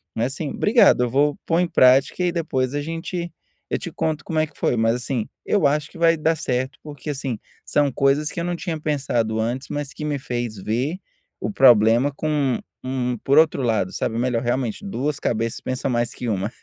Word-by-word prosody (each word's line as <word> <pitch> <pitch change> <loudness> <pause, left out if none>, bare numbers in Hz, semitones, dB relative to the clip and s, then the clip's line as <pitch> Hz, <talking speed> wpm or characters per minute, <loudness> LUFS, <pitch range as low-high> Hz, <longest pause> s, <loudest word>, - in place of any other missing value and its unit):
mas, 120 +4 -1
assim, 150 +1 -4
obrigado, 215 - +4
eu - - -3
vou 145 +3 +2
pôr 165 +1 +2
em 180 - +2
prática 135 0 +4
e, - - +2
aí, 175 - +2
depois 135 -6 -1
a 145 - -1
gente 165 +2 -4 0.4
eu - - +1
te - - -5
conto 155 -1 -2
como 160 - -3
é 155 - +3
que 155 - -19
foi, - - +1
mas, 115 0 +2
assim, 125 -2 -3 0.2
eu 205 - +2
acho 150 +1 +1
que - - -14
vai 165 0 +4
dar 160 +1 +1
certo 130 -2 -2
porque, 150 -1 -8
assim, 135 -5 -3 0.3
são 145 -1 +2
coisas 140 +3 +1
que - - -12
eu - - -2
não 175 +1 -1
tinha 170 -1 -3
pensado 130 -7 -1
antes, 120 +4 -2
mas 145 -1 -4
que - - -7
me 150 -2 -1
fez 120 -4 -4
ver 120 - -2 0.4
o - - -3
problema 120 - +5
com 145 -3 0 0.2
um 125 -1 -2
por 140 +2 +3
outro 155 -3 +4
lado, 110 -6 0
sabe, 115 - -2
melhor, 120 -1 0
realmente, 120 - -1
2 150 -7 -2
cabeças 115 0 -1
pensa 130 +1 -3
mais 120 -2 0
que 120 - -6
1. 100 -1 -1
135 Hz, 215 wpm, -22 LUFS, 120-155 Hz, 0.4 s, problema